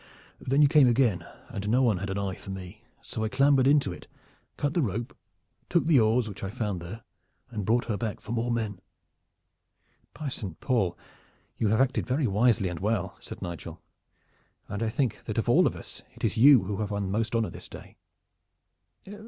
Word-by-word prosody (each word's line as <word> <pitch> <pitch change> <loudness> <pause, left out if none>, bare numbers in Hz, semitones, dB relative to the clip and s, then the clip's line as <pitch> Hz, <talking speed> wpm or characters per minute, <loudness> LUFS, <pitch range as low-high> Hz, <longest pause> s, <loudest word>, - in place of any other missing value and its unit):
Then 140 +3 +2
you - - +7
came 145 -2 +6
again, 115 -8 +2 0.2
and 100 +1 -4
no 125 +4 +3
one 110 -6 +3
had 100 +2 -4
an 95 - -2
eye 100 -1 -2
for 100 - -11
me, 95 +2 -8 0.2
so 110 - -4
I 110 - 0
clambered 135 +1 +4
into 140 -10 +3
it, - - -12 0.5
cut 145 0 -1
the 170 - +2
rope, 115 -1 -3 0.5
took 170 - +2
the 160 -5 +5
oars 110 +1 +3
which 100 -1 -8
I 95 - -2
found 105 -4 -3
there 105 +7 -8 0.5
and 105 -4 -4
brought 120 +2 +2
her 110 -3 -2
back 110 -2 -3
for 110 - -9
more 120 +1 -1
men." 110 -5 -2 1.3
"By 155 - -5
Saint 95 - -6
Paul! 100 -10 0 0.6
you 110 - 0
have 110 +2 +2
acted 130 -1 +1
very 135 +3 +1
wisely 105 -1 +3
and 90 -2 -4
well," 100 -2 -1
said - - -9
Nigel, 85 -1 -7 0.9
"and 100 - -5
I 115 - +1
think 125 0 -1
that - - -4
of - - 0
all - - +5
of - - -2
us - - -9
it - - -14
is 110 -2 +1
you 130 +1 +7
who 100 - -3
have 105 -1 -2
won 100 -2 -2
most 110 +2 -1
honor 115 -2 0
this - - -10
day. - - -12
110 Hz, 200 wpm, -28 LUFS, 100-125 Hz, 1.3 s, you